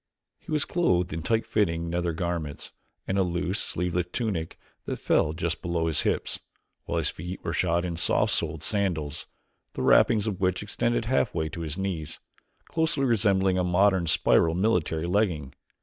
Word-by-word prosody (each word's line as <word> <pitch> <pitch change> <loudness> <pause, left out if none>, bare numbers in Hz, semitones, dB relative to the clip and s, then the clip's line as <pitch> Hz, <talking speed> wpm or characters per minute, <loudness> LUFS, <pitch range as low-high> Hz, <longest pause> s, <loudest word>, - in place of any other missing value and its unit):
He - - -11
was 150 -2 +1
clothed 90 - +1
in 80 - -3
tight 115 +6 0
fitting 85 -6 0
nether 85 0 -1
garments 80 -3 -4 0.4
and 95 +1 0
a - - +5
loose, 90 +2 -1
sleeveless 90 0 -1
tunic 95 -9 -2 0.3
that - - -2
fell 75 - +2
just 85 +1 -3
below 85 -1 -1
his 80 -3 +2
hips, - - -1 0.5
while - - -2
his - - 0
feet 90 +3 -7
were - - -2
shod 85 0 +1
in 85 -1 -3
soft - - +2
soled 80 -2 -1
sandals, 85 -8 -1 0.5
the - - -3
wrappings 110 -3 +5
of 100 -3 -3
which 95 +1 +1
extended 115 +3 -1
halfway 105 -10 0
to 85 +2 -7
his 80 0 -4
knees, 90 -6 -4 0.5
closely 160 -4 0
resembling 95 -5 +2
a - - +2
modern 90 0 +3
spiral 80 +1 +3
military 90 -5 +1
legging. 85 -8 0
90 Hz, 165 wpm, -27 LUFS, 80-100 Hz, 0.5 s, a